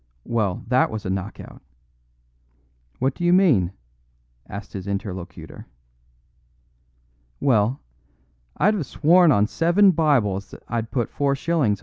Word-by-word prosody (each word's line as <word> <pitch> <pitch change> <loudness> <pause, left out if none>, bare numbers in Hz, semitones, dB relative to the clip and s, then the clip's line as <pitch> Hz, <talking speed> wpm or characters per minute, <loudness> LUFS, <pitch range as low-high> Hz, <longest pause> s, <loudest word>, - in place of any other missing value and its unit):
Well, 105 -6 -1
that 125 +1 +3
was 110 -1 -6
a 95 - -2
knock 95 +2 -4
out." - - -12 1.4
"What 130 +1 0
do 175 - -7
you 175 - +3
mean?" 150 - +4 0.8
asked 100 +1 -8
his 95 -1 -6
interlocutor. 95 -3 -6 1.7
"Well, 120 -1 +2 0.8
I'd 210 +3 +3
have 180 -10 -3
sworn 170 +1 +4
on 105 -5 +3
seven 170 - +3
Bibles 120 - +1
that - - -13
I'd 115 -1 -3
put 120 -1 -2
4s. 140 - 0
120 Hz, 120 wpm, -23 LUFS, 100-160 Hz, 1.7 s, mean